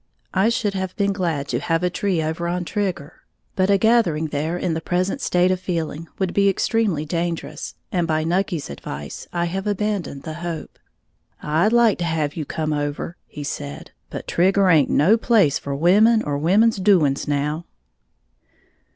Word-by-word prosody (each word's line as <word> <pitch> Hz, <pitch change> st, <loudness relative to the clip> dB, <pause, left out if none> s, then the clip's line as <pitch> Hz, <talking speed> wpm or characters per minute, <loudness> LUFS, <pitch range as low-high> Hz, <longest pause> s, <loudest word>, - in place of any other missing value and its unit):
I 195 Hz, +4 st, +3 dB
should 215 Hz, -3 st, 0 dB
have 190 Hz, -1 st, -3 dB
been 200 Hz, -1 st, +1 dB
glad 165 Hz, -7 st, -2 dB
to 120 Hz, -, 0 dB
have 165 Hz, +4 st, 0 dB
a 180 Hz, -, +1 dB
tree 185 Hz, -4 st, 0 dB
over 160 Hz, +2 st, -2 dB
on 175 Hz, 0 st, -2 dB
Trigger; 180 Hz, -7 st, -3 dB, 0.3 s
but 185 Hz, 0 st, +2 dB
a 200 Hz, -, +5 dB
gathering 190 Hz, -8 st, +2 dB
there 155 Hz, +4 st, -2 dB
in 175 Hz, -1 st, -1 dB
the 160 Hz, -, -3 dB
present 180 Hz, +3 st, -1 dB
state 180 Hz, +1 st, +2 dB
of 185 Hz, -, 0 dB
feeling 165 Hz, -3 st, -3 dB
would 190 Hz, -2 st, -1 dB
be 200 Hz, 0 st, +4 dB
extremely 195 Hz, -5 st, 0 dB
dangerous, 170 Hz, +1 st, -3 dB, 0.2 s
and 175 Hz, -3 st, 0 dB
by 155 Hz, -1 st, +1 dB
Nucky's 170 Hz, -, -1 dB
advice, 70 Hz, +1 st, -7 dB
I 170 Hz, -1 st, 0 dB
have 190 Hz, +4 st, -3 dB
abandoned 205 Hz, -8 st, -2 dB
the 160 Hz, -, -5 dB
hope. 170 Hz, -2 st, -6 dB, 0.6 s
"I'd 160 Hz, +8 st, +2 dB
like 235 Hz, -4 st, +4 dB
to 175 Hz, -, -1 dB
have 155 Hz, -3 st, -1 dB
you 155 Hz, -, -3 dB
come 155 Hz, +1 st, -2 dB
over," 145 Hz, +3 st, -3 dB
he 150 Hz, -, -8 dB
said; 70 Hz, -, -6 dB, 0.2 s
"but -, -, -6 dB
Trigger 190 Hz, +2 st, +3 dB
haint 150 Hz, -5 st, +4 dB
no 190 Hz, +10 st, +4 dB
place 215 Hz, -, +3 dB
for 140 Hz, -1 st, -4 dB
women 210 Hz, +9 st, +4 dB
or 145 Hz, -, -2 dB
women's 200 Hz, +10 st, +3 dB
doings 180 Hz, -8 st, +3 dB
now." 150 Hz, +3 st, -1 dB
175 Hz, 175 wpm, -22 LUFS, 155-195 Hz, 0.6 s, a